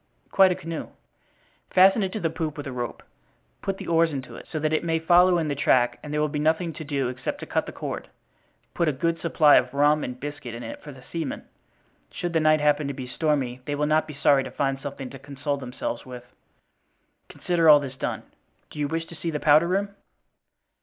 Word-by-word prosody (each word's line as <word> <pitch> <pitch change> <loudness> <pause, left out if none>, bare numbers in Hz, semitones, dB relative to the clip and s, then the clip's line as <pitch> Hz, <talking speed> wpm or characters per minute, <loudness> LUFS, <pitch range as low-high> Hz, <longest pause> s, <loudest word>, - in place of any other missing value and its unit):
"Quite 190 -1 +6
a - - 0
canoe." 165 -1 -6 0.8
"Fasten 190 +4 +5
it 190 -1 -1
to 215 - -3
the 165 -4 -1
poop 160 -2 -4
with 145 - -6
a 135 - -5
rope; 120 -2 -5 0.6
put 195 -1 -3
the - - -8
oars 165 -1 +3
into 135 -3 -6
it, - - -11
so - - -4
that 155 0 0
it 155 - +1
may 165 -1 +1
follow 175 +2 +5
in 160 -2 -1
the 145 - -1
track 125 -3 +2
and 150 - -8
there 150 - -1
will 150 - +2
be 150 0 -3
nothing 160 +2 +1
to 155 - -7
do 140 -3 -1
except 125 0 -4
to - - -5
cut - - -1
the - - -5
cord. - - -6 0.6
Put 170 - 0
a 155 - +2
good 165 +5 -1
supply 155 -3 +5
of 125 +2 0
rum 150 +1 +3
and 125 0 -5
biscuit 145 -5 -6
in 120 - -7
it 115 - -7
for 150 - -9
the 130 -2 -14
seamen; 165 +1 -5 0.7
should 175 -1 -4
the 165 - +3
night 155 -1 +3
happen 150 0 +2
to 140 - -4
be 130 - -6
stormy 130 -2 -1
they 145 - -2
will 150 +1 0
not 155 +1 +2
be 150 - -8
sorry 140 -1 +4
to - - -6
find 135 -1 -1
something 135 -2 -6
to 135 - -10
console 140 +1 -4
themselves 125 -2 -5
with." 125 -1 -10 1.0
"Consider 170 -2 +1
all 150 -1 +9
this 135 -2 -6
done. - - -4 0.5
Do - - -9
you 145 - 0
wish 165 +2 -3
to 170 - -13
see 165 - -4
the 150 -2 -2
powder 155 +3 +5
room?" 195 +3 0
150 Hz, 230 wpm, -25 LUFS, 135-165 Hz, 1.0 s, all